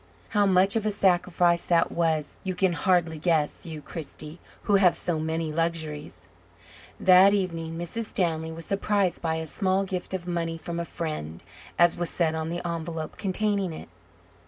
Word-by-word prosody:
How 205 Hz, -2 st, +3 dB
much 190 Hz, +2 st, +4 dB
of 215 Hz, -1 st, 0 dB
a -, -, +1 dB
sacrifice 175 Hz, -3 st, +2 dB
that 170 Hz, -1 st, +2 dB
was 160 Hz, -3 st, -1 dB
you 185 Hz, -1 st, -3 dB
can 185 Hz, -1 st, +2 dB
hardly 165 Hz, -1 st, +1 dB
guess, 160 Hz, -1 st, 0 dB
you, 155 Hz, -2 st, -7 dB
Kristy, 155 Hz, 0 st, -7 dB, 0.2 s
who 205 Hz, -2 st, +4 dB
have 185 Hz, -3 st, +5 dB
so 165 Hz, -3 st, -1 dB
many 160 Hz, 0 st, -2 dB
luxuries. 155 Hz, -, -3 dB, 0.7 s
That 190 Hz, +2 st, +7 dB
evening 165 Hz, -4 st, -3 dB
Mrs. 175 Hz, +7 st, -4 dB
Stanley 160 Hz, -6 st, -1 dB
was 165 Hz, 0 st, -8 dB
surprised 200 Hz, -1 st, 0 dB
by 160 Hz, -1 st, 0 dB
a 160 Hz, 0 st, -3 dB
small 190 Hz, +4 st, 0 dB
gift 190 Hz, -1 st, -4 dB
of 175 Hz, -2 st, -5 dB
money 170 Hz, -2 st, -2 dB
"from 170 Hz, +1 st, -5 dB
a 170 Hz, -, -2 dB
friend," 155 Hz, -, -5 dB, 0.3 s
as 175 Hz, -1 st, +5 dB
was 175 Hz, -2 st, -2 dB
said 160 Hz, +2 st, 0 dB
on 160 Hz, 0 st, -3 dB
the 175 Hz, +1 st, -4 dB
envelope 165 Hz, -1 st, -5 dB
containing 200 Hz, -2 st, +1 dB
it. -, -, -9 dB
170 Hz, 170 wpm, -26 LUFS, 160-185 Hz, 0.7 s, That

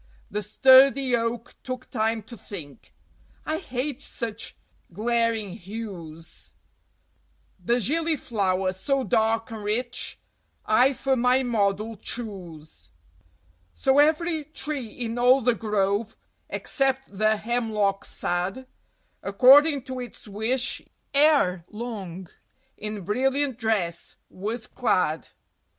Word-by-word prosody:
The 210 Hz, -, -1 dB
sturdy 260 Hz, +3 st, +6 dB
Oak 230 Hz, 0 st, -2 dB
took 255 Hz, 0 st, -6 dB
time 220 Hz, 0 st, 0 dB
to 225 Hz, +3 st, -11 dB
think 190 Hz, -5 st, -10 dB, 0.5 s
"I 315 Hz, +1 st, -1 dB
hate 270 Hz, -3 st, -3 dB
such 230 Hz, -5 st, -6 dB, 0.4 s
glaring 225 Hz, +1 st, 0 dB
hues; 175 Hz, -6 st, -8 dB, 1.1 s
The 240 Hz, +6 st, +2 dB
Gillyflower, 225 Hz, -, 0 dB
so 270 Hz, +8 st, 0 dB
dark 225 Hz, -1 st, +1 dB
and 220 Hz, -2 st, -6 dB
rich, 240 Hz, +4 st, -3 dB, 0.5 s
I 250 Hz, +5 st, +4 dB
for 270 Hz, +1 st, 0 dB
my 250 Hz, +1 st, +3 dB
model 215 Hz, -2 st, 0 dB
choose." 170 Hz, -, -6 dB, 0.9 s
So 270 Hz, +1 st, +3 dB
every 315 Hz, +1 st, +2 dB
tree 290 Hz, -4 st, -5 dB
in 230 Hz, +1 st, -4 dB
all 250 Hz, +2 st, +6 dB
the 245 Hz, +1 st, +3 dB
grove, 210 Hz, 0 st, -1 dB, 0.3 s
except 270 Hz, -5 st, -1 dB
the 215 Hz, +2 st, +2 dB
Hemlock 215 Hz, -4 st, 0 dB
sad, 185 Hz, +9 st, -3 dB, 0.6 s
According 270 Hz, +7 st, +6 dB
to 260 Hz, 0 st, -6 dB
its 245 Hz, -2 st, -9 dB
wish 220 Hz, +5 st, -1 dB, 0.3 s
ere 280 Hz, -, +4 dB
long 200 Hz, -6 st, -6 dB, 0.5 s
in 210 Hz, -1 st, -5 dB
brilliant 265 Hz, +6 st, 0 dB
dress 195 Hz, -7 st, -1 dB, 0.2 s
was 220 Hz, +5 st, -4 dB
clad. 185 Hz, -9 st, 0 dB
230 Hz, 105 wpm, -25 LUFS, 200-260 Hz, 1.1 s, sturdy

